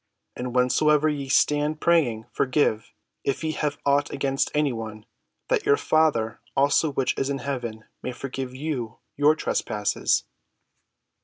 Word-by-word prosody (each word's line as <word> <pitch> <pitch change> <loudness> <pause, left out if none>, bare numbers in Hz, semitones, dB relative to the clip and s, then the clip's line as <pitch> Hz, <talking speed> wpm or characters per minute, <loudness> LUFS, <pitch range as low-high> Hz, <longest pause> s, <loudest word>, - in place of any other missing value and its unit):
And 125 0 -5
whensoever 150 +4 +3
ye 140 -3 -3
stand 150 +3 +2
praying, 135 -11 +2
forgive, 125 -4 +1 0.3
if 140 +3 -1
ye 160 - 0
have 150 -2 -2
aught 140 +1 +2
against 135 -1 0
any 150 -3 +2
one; 110 -2 -7 0.4
that - - +1
your 430 +1 +5
Father 155 - +1 0.2
also 145 +3 +3
which 135 -2 0
is 135 - 0
in 140 - -1
heaven 120 -5 -5 0.2
may 125 - -4
forgive 130 0 -6
you 130 -6 -4 0.2
your 145 +2 +4
trespasses." 105 -8 0
140 Hz, 140 wpm, -25 LUFS, 125-150 Hz, 0.4 s, your